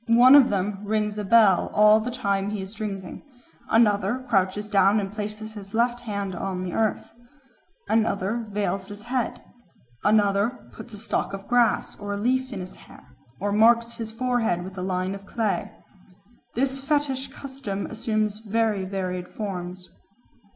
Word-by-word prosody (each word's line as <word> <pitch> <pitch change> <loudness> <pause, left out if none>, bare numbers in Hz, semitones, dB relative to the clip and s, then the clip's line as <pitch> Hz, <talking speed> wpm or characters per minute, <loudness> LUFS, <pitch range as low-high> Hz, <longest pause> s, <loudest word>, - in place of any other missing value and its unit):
One 240 +3 +7
of 280 -3 +8
them 200 0 -1
rings 210 0 -1
a - - -2
bell 205 -3 +5
all 210 +1 +7
the 225 +3 -3
time 200 -5 -1
he 210 -2 -3
is 190 +2 -9
drinking; 200 -4 -6 0.5
another 220 +2 +2
crouches 200 -1 +1
down 200 0 +4
and 195 -1 -4
places 215 +1 -6
his 200 -1 -9
left 240 +1 +2
hand 200 -5 -4
on 185 +1 -3
the 185 -1 -4
earth; 220 -2 -1 0.7
another 220 +1 0
veils 200 -2 -2
his 205 0 -9
head; 245 +1 -2 0.6
another 210 +3 +3
puts 230 - -10
a - - -9
stalk 200 -1 -2
of 195 0 -7
grass 245 -2 +2
or 205 0 -4
a - - -2
leaf 255 +4 0
in 195 - -5
his 185 - -8
hair, - - -16 0.3
or 205 +2 -1
marks 230 +2 +4
his 225 -1 -5
forehead 230 -6 0
with 190 +1 -9
a 185 - -5
line 185 0 -1
of 200 0 -10
clay. 220 -1 -1 0.9
This 270 +2 0
fetish 275 -2 0
custom 265 -7 -6
assumes 215 -2 -1
very 220 -2 0
varied 185 -2 -3
forms. 180 -3 -6
210 Hz, 160 wpm, -25 LUFS, 195-230 Hz, 0.9 s, of